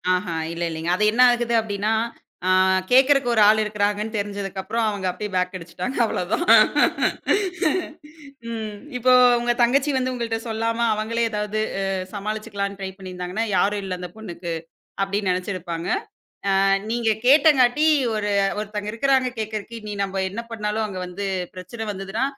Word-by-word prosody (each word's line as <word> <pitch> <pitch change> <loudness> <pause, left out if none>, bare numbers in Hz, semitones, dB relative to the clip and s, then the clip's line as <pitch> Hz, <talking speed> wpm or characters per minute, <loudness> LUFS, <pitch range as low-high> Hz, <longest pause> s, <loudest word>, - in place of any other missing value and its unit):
ஆஹா 180 -2 -3 0.2
இல்ல 170 +1 -4
இல்லைங்க. 160 +1 -4
அது 210 - 0
என்னா 250 +3 +4
ஆகுது 235 -1 -1
அப்படின்னா? 210 0 -1 0.5
அ - - +3 0.4
கேக்குறதுக்கு 265 0 +4
ஒரு 220 - +4
ஆள் 220 +1 +5
இருக்குறாங்கன்னு 210 +1 -1
தெரிஞ்சதுக்கப்புறம், 200 +2 -3
அவங்க 200 -2 -4
அப்பிடியே 210 +2 -5
பேக் 180 +1 0
அடிச்சிட்டாங்க, 180 +9 -6
அவ்ளோதான். 195 - -1 2.1
ம், 220 -2 -5 0.2
இப்போ 255 +1 +4 0.3
உங்க 240 0 +1
தங்கச்சி 270 +5 +3
வந்து 255 0 0
உங்கள்ட்ட 230 -2 -2
சொல்லாம, 230 +1 -1
அவங்களே 230 +2 -1
ஏதாவது 210 0 -2 0.5
சமாளிச்சுக்கலாம்னு 205 -1 -4
ட்ரை 190 - -3
பண்ணீருந்தாங்கன்னா, 185 +2 -4
"யாரும் 205 +2 +1
இல்ல 185 -1 -4
அந்த 180 -1 -6
பொண்ணுக்கு" 175 -5 -6 0.5
அப்படின்னு 195 0 0
நெனச்சிருப்பாங்க. 180 -2 -3 0.7
அ - - +3 0.3
நீங்க 230 -2 +1
கேட்டங்க்காட்டி, 290 -1 +5 0.3
ஒரு 210 -1 -1 0.3
ஒருத்தங்க 210 0 -4
இருக்குறாங்க 260 +2 +2
கேக்குறக்கு, 215 +1 -5
இனி 210 -1 -5
நம்ப 195 0 -3
என்ன 215 +5 -5
பண்ணாலும் 215 0 -2
அங்க 190 -3 -6
வந்து 195 +3 -5 0.3
பிரச்சனை 220 +5 -7
வந்ததுனா, 195 +5 -3
210 Hz, 135 wpm, -23 LUFS, 195-230 Hz, 2.1 s, ஆள்